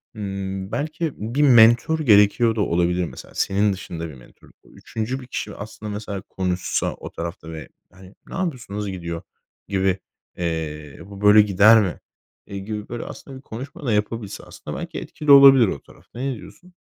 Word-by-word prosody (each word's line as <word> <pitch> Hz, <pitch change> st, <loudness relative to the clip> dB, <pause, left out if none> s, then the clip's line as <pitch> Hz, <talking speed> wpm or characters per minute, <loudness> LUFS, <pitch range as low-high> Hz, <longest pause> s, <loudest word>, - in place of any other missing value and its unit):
Hımm, 95 Hz, -1 st, -5 dB
belki 155 Hz, +1 st, -2 dB
bir 115 Hz, +7 st, -2 dB
mentor 120 Hz, +4 st, +6 dB
gerekiyor 110 Hz, -2 st, +4 dB
da 110 Hz, -, 0 dB
olabilir 90 Hz, -1 st, +1 dB
mesela -, -, -11 dB
senin 100 Hz, +1 st, +1 dB
dışında 85 Hz, -3 st, -6 dB
bir -, -, -10 dB
mentor 60 Hz, -, -18 dB
bu. -, -, -21 dB
3'üncü 115 Hz, +4 st, -4 dB
bir 125 Hz, -, -12 dB
kişi 105 Hz, -4 st, -5 dB
aslında 105 Hz, +1 st, -8 dB
mesela 105 Hz, -1 st, -5 dB
konuşsa 90 Hz, -1 st, -2 dB
o -, -, -10 dB
tarafta 85 Hz, -1 st, -6 dB
ve, 80 Hz, -1 st, -8 dB, 0.2 s
hani, 95 Hz, +1 st, -16 dB
"Ne -, -, -8 dB
yapıyorsun, 155 Hz, -, -4 dB
nasıl 105 Hz, -1 st, -3 dB
gidiyor?" 85 Hz, -3 st, -5 dB, 0.5 s
gibi, 95 Hz, -1 st, +1 dB, 0.4 s
eee, 80 Hz, -4 st, -4 dB
"Bu 100 Hz, 0 st, -11 dB
böyle 105 Hz, +1 st, +8 dB
gider 105 Hz, +2 st, +6 dB
mi?" 95 Hz, -4 st, -3 dB, 0.5 s
eee, 100 Hz, -, -6 dB
gibi 105 Hz, +1 st, -6 dB
böyle 120 Hz, 0 st, -5 dB
aslında 135 Hz, -2 st, -10 dB
bir 130 Hz, -, -13 dB
konuşma 140 Hz, +8 st, -8 dB
da 115 Hz, -, +1 dB
yapabilse 105 Hz, 0 st, -2 dB
aslında -, -, -8 dB
belki -, -, -5 dB
etkili 150 Hz, -2 st, -1 dB
olabilir 135 Hz, -4 st, +9 dB
o 70 Hz, -, -3 dB
tarafta. 115 Hz, -, -16 dB
Ne 135 Hz, 0 st, -2 dB
diyorsun? 180 Hz, +10 st, -14 dB
105 Hz, 175 wpm, -22 LUFS, 95-120 Hz, 0.5 s, olabilir